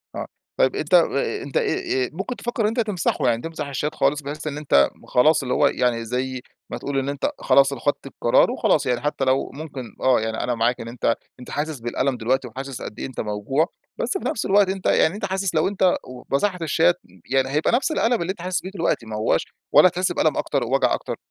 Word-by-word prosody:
آه -, -, -3 dB, 0.3 s
طيب 130 Hz, -, +3 dB
أنت 155 Hz, +3 st, -3 dB
أ 175 Hz, -, +10 dB, 0.4 s
أ -, -, -7 dB
أنت 140 Hz, -, -3 dB
آآ -, -, +3 dB, 0.4 s
آآ -, -, -6 dB
ممكن 195 Hz, +9 st, -4 dB
تفكر 240 Hz, -1 st, -2 dB
إن -, -, +3 dB
أنت 225 Hz, +3 st, -1 dB
تمسحه، 210 Hz, -6 st, 0 dB
يعني 115 Hz, 0 st, 0 dB
تمسح 160 Hz, -1 st, -5 dB
الشات 145 Hz, +3 st, -3 dB
خالص 145 Hz, +2 st, +1 dB
بحيث 150 Hz, +2 st, -6 dB
إن 145 Hz, 0 st, -3 dB
أنت 70 Hz, -, +3 dB
م -, -, -19 dB
خلاص 155 Hz, +5 st, +4 dB
اللي 125 Hz, -, -1 dB
هو -, -, +4 dB
يعني 115 Hz, -2 st, 0 dB
زي 130 Hz, +2 st, -3 dB, 0.3 s
ما -, -, -4 dB
تقول 140 Hz, -1 st, -2 dB
إن 135 Hz, +1 st, -2 dB
أنت 140 Hz, -1 st, -1 dB
خلاص 140 Hz, 0 st, +4 dB
أنا 125 Hz, -4 st, -6 dB
أخدت 145 Hz, -1 st, -1 dB
القرار 120 Hz, -3 st, +3 dB
وخلاص، -, -, +2 dB
يعني 125 Hz, -1 st, 0 dB
حتى 145 Hz, -2 st, -1 dB
لو 130 Hz, +1 st, +1 dB
ممكن 140 Hz, -5 st, -8 dB
آه 130 Hz, -3 st, +4 dB
يعني 110 Hz, 0 st, -2 dB
أنا 120 Hz, -1 st, -1 dB
معاك 120 Hz, +2 st, +1 dB
إن 115 Hz, -, -7 dB
أنت 115 Hz, -1 st, 0 dB, 0.2 s
أنت 125 Hz, -, -11 dB
حاسس 150 Hz, -1 st, -3 dB
بالألم 125 Hz, +3 st, -1 dB
دلوقتي 125 Hz, +3 st, 0 dB
وحاسس 135 Hz, +2 st, -7 dB
قدّ -, -, -7 dB
إيه -, -, -3 dB
أنت 130 Hz, -, -8 dB
موجوع، 110 Hz, +9 st, 0 dB, 0.3 s
بس 390 Hz, -, -1 dB
في -, -, -3 dB
نفس -, -, -2 dB
الوقت 200 Hz, -1 st, +4 dB
أنت 190 Hz, -1 st, -4 dB
يعني 165 Hz, -, +3 dB
أنت 205 Hz, -, -3 dB
حاسس 190 Hz, -2 st, -2 dB
لو 155 Hz, -, +3 dB
أنت 195 Hz, -1 st, -2 dB, 0.2 s
و 125 Hz, -1 st, -10 dB
مسحت 180 Hz, +3 st, 0 dB
الشات 140 Hz, -, +3 dB, 0.4 s
يعني 135 Hz, 0 st, +2 dB
هيبقى 150 Hz, +3 st, +1 dB
نفس 265 Hz, +6 st, +1 dB
الألم 240 Hz, -, +1 dB
اللي 175 Hz, +3 st, -1 dB
أنت 185 Hz, -, -9 dB
حاسس 180 Hz, -2 st, -1 dB
بيه 190 Hz, -, -6 dB
دلوقتي 165 Hz, -, -1 dB
ما 110 Hz, -, -6 dB
هواش 110 Hz, +1 st, +1 dB, 0.3 s
ولا -, -, +8 dB
هتحس 180 Hz, +1 st, 0 dB
بألم -, -, +1 dB
أكتر، -, -, 0 dB
ووجع -, -, +2 dB
أكتر؟ -, -, -3 dB
140 Hz, 235 wpm, -23 LUFS, 125-175 Hz, 0.4 s, أ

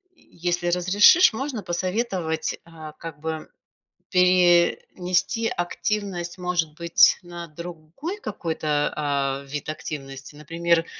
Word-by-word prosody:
если 175 Hz, -, -3 dB
разрешишь, 195 Hz, -, +6 dB
можно 250 Hz, -2 st, -4 dB
посоветовать, 180 Hz, -2 st, -2 dB
а, 160 Hz, -2 st, -10 dB
как 165 Hz, -2 st, -9 dB
бы 160 Hz, 0 st, -4 dB, 0.6 s
пе 180 Hz, -2 st, +4 dB
нести 185 Hz, +6 st, 0 dB
активность, 180 Hz, -1 st, -3 dB
может 175 Hz, -3 st, -1 dB
быть, 170 Hz, -1 st, +5 dB
на 175 Hz, -1 st, -8 dB
другой 170 Hz, -, -7 dB
какой-то, 160 Hz, -7 st, -1 dB
а, 140 Hz, -2 st, -1 dB
вид 145 Hz, +2 st, -5 dB
активности, 135 Hz, -2 st, -7 dB
например, 165 Hz, +2 st, 0 dB
170 Hz, 105 wpm, -24 LUFS, 155-180 Hz, 0.6 s, разрешишь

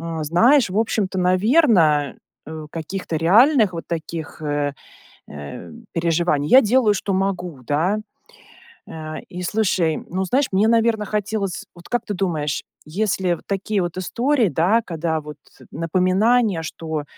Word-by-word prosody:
э, 165 Hz, 0 st, -5 dB
знаешь, 235 Hz, -, +4 dB
в 195 Hz, -, -1 dB
общем-то, 210 Hz, -4 st, 0 dB
наверно, 185 Hz, -, +3 dB, 0.3 s
э, 155 Hz, 0 st, -7 dB
каких-то 165 Hz, +1 st, -5 dB
реальных 215 Hz, -, +4 dB
вот 165 Hz, -, -6 dB
таких, 160 Hz, -1 st, -6 dB
э, 145 Hz, -1 st, -1 dB, 0.6 s
э, 75 Hz, -1 st, -9 dB, 0.2 s
переживаний 165 Hz, -3 st, 0 dB
Я 265 Hz, -, +8 dB
делаю, 225 Hz, -1 st, +3 dB
что 195 Hz, 0 st, -2 dB
могу, 185 Hz, -6 st, -2 dB
да. 175 Hz, +9 st, +1 dB, 0.9 s
Э, 155 Hz, -1 st, -7 dB
и 180 Hz, -, -7 dB
слушай, 180 Hz, -5 st, +1 dB
ну, 185 Hz, +2 st, -2 dB
знаешь, 265 Hz, +8 st, +1 dB
мне, 200 Hz, +3 st, +3 dB
наверно, 225 Hz, -2 st, +2 dB
хотелось 210 Hz, -2 st, -3 dB
Вот 175 Hz, 0 st, -14 dB
как 245 Hz, -, -1 dB
ты 210 Hz, -, -3 dB
думаешь, 160 Hz, -7 st, -2 dB, 0.3 s
если 185 Hz, 0 st, 0 dB
в -, -, -6 dB
такие 200 Hz, +1 st, -1 dB
вот 175 Hz, 0 st, -4 dB
истории, 240 Hz, +5 st, +1 dB
да, 180 Hz, -, +2 dB
когда 165 Hz, -4 st, -2 dB
вот 150 Hz, 0 st, -9 dB, 0.4 s
напоминание, 185 Hz, +4 st, +1 dB
что 160 Hz, -2 st, -5 dB
180 Hz, 140 wpm, -21 LUFS, 160-215 Hz, 0.9 s, Я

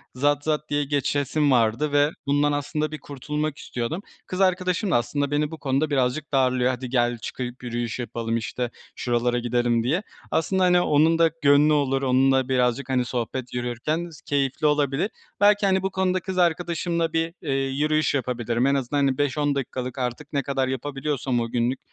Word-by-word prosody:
zat 145 Hz, +2 st, +1 dB
zat 150 Hz, -1 st, -1 dB
diye 145 Hz, 0 st, +1 dB
geçesim 145 Hz, +1 st, 0 dB
vardı 120 Hz, +4 st, +2 dB
ve 145 Hz, +1 st, +3 dB
bundan 145 Hz, +1 st, +2 dB
aslında 150 Hz, +1 st, -2 dB
bir 155 Hz, -, -6 dB
kurtulmak 150 Hz, +2 st, -4 dB
istiyordum. 125 Hz, +9 st, -4 dB, 0.3 s
Kız 185 Hz, +1 st, -3 dB
arkadaşım 185 Hz, +1 st, +1 dB
da -, -, +3 dB
aslında 140 Hz, +4 st, 0 dB
beni 150 Hz, +1 st, 0 dB
bu 160 Hz, -, -6 dB
konuda 140 Hz, +2 st, 0 dB
birazcık 140 Hz, +1 st, 0 dB
darlıyor. 130 Hz, -2 st, +3 dB
“Hadi 125 Hz, 0 st, -5 dB
gel, 120 Hz, -1 st, +1 dB
çıkıp 125 Hz, +3 st, -6 dB
yürüyüş 120 Hz, 0 st, -3 dB
yapalım.“ 115 Hz, -1 st, -2 dB
işte, 120 Hz, +2 st, -3 dB, 0.2 s
“şuralara 120 Hz, 0 st, 0 dB
gidelim.“ 120 Hz, -1 st, +1 dB
diye. 160 Hz, -, 0 dB, 0.3 s
Aslında 190 Hz, +3 st, +1 dB
hani 180 Hz, -1 st, +5 dB
onun 160 Hz, +1 st, +3 dB
da 165 Hz, -1 st, +5 dB
gönlü 145 Hz, +2 st, +5 dB
olur, 135 Hz, -2 st, +1 dB
onunla 130 Hz, 0 st, +3 dB
birazcık, 125 Hz, +1 st, +1 dB
hani, 125 Hz, -1 st, +1 dB
sohbet 125 Hz, +1 st, -4 dB
yürürken 125 Hz, +8 st, -2 dB
s 155 Hz, -, -14 dB
keyifli 140 Hz, +1 st, 0 dB
olabilir. 150 Hz, +4 st, +1 dB, 0.3 s
Belki, 205 Hz, 0 st, +5 dB
hani, 190 Hz, -1 st, +3 dB
bu 190 Hz, -, -1 dB
konuda 185 Hz, 0 st, +1 dB
kız 185 Hz, +1 st, -5 dB
arkadaşımla 170 Hz, -1 st, 0 dB
bir, 165 Hz, 0 st, 0 dB
eee, 145 Hz, -5 st, -2 dB
yürüyüş 145 Hz, +3 st, +1 dB
yapabilirim 120 Hz, -2 st, -1 dB
en 140 Hz, -, +3 dB
azından 135 Hz, +1 st, -1 dB
hani 135 Hz, -1 st, +1 dB
5-10 145 Hz, 0 st, 0 dB
dakikalık, 130 Hz, -1 st, -4 dB
artık 130 Hz, +4 st, -4 dB
ne 140 Hz, -1 st, 0 dB
kadar 135 Hz, 0 st, -1 dB
yapabiliyorsam 135 Hz, -1 st, -2 dB
o 115 Hz, 0 st, -2 dB
günlük. 120 Hz, +2 st, 0 dB
140 Hz, 175 wpm, -24 LUFS, 125-155 Hz, 0.3 s, hani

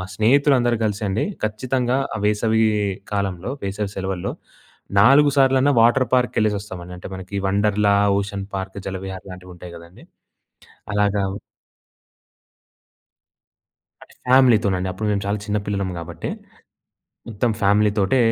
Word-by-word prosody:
స్నేహితులు 135 Hz, +7 st, +4 dB
అందరూ 120 Hz, -1 st, +1 dB
కలిసండి, 105 Hz, -1 st, -1 dB, 0.2 s
ఖచ్చితంగా 125 Hz, +3 st, -1 dB, 0.2 s
ఆ -, -, -3 dB
వేసవి 110 Hz, +1 st, +2 dB, 0.5 s
కాలంలో, 100 Hz, +1 st, -2 dB
వేసవి 100 Hz, +1 st, -3 dB
సెలవుల్లో 95 Hz, -2 st, -3 dB, 0.7 s
నాలుగు 140 Hz, +7 st, +6 dB
సార్లన్నా 135 Hz, +1 st, +4 dB
వాటర్ 120 Hz, +2 st, +4 dB
పార్క్‌కి 125 Hz, -1 st, +2 dB
వెళ్ళేసొస్తామండి. 100 Hz, -4 st, -3 dB
అంటే 90 Hz, -, -9 dB
మనకి 95 Hz, +1 st, -8 dB
వండర్‌లా, 100 Hz, +1 st, +2 dB, 0.2 s
ఓషన్ 100 Hz, 0 st, -4 dB
పార్క్, 95 Hz, 0 st, -5 dB
జలవిహార్ 95 Hz, 0 st, -6 dB
లాంటివి 90 Hz, 0 st, -11 dB
ఉంటాయి 90 Hz, 0 st, -11 dB
గదండీ! 85 Hz, +2 st, -15 dB, 0.9 s
అలాగా 105 Hz, 0 st, +1 dB, 2.8 s
అంటే -, -, -17 dB
ఫ్యామిలీతోనండి. 110 Hz, -8 st, +4 dB
అప్పుడు 105 Hz, +4 st, -4 dB
మేము 100 Hz, -1 st, -1 dB
చాలా 100 Hz, +1 st, -1 dB
చిన్న 105 Hz, 0 st, 0 dB
పిల్లలం 100 Hz, -2 st, -2 dB
కాబట్టి, 85 Hz, 0 st, -6 dB, 1.0 s
మొత్తం 115 Hz, +2 st, -1 dB
ఫ్యామిలీతోటే, 105 Hz, +3 st, +2 dB
105 Hz, 110 wpm, -21 LUFS, 95-115 Hz, 2.8 s, నాలుగు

